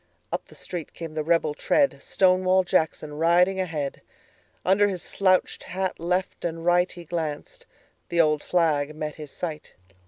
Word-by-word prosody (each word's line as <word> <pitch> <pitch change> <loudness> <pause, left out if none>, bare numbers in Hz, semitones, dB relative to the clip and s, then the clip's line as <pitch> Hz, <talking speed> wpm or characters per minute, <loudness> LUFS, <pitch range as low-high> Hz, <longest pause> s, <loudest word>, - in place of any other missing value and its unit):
Up - - -3
the - - -16
street 175 -4 -6
came 165 -2 -7
the 155 -1 -2
rebel 165 -2 +2
tread, 280 - +1
Stonewall 185 0 +3
Jackson 160 -4 0
riding 180 +3 +4
ahead. 155 -7 -3 0.6
Under 195 +2 +4
his 185 -4 -3
slouched 185 -2 +1
hat 190 0 -3
left 180 +2 -1
and 165 -1 -3
rightHe 175 -1 +1
glanced: 160 -3 -4 0.4
the 170 - 0
old 150 -2 +4
flag 155 -4 +1
met 155 -1 -4
his 150 - -8
sight. 155 0 -6
170 Hz, 150 wpm, -25 LUFS, 155-185 Hz, 0.6 s, riding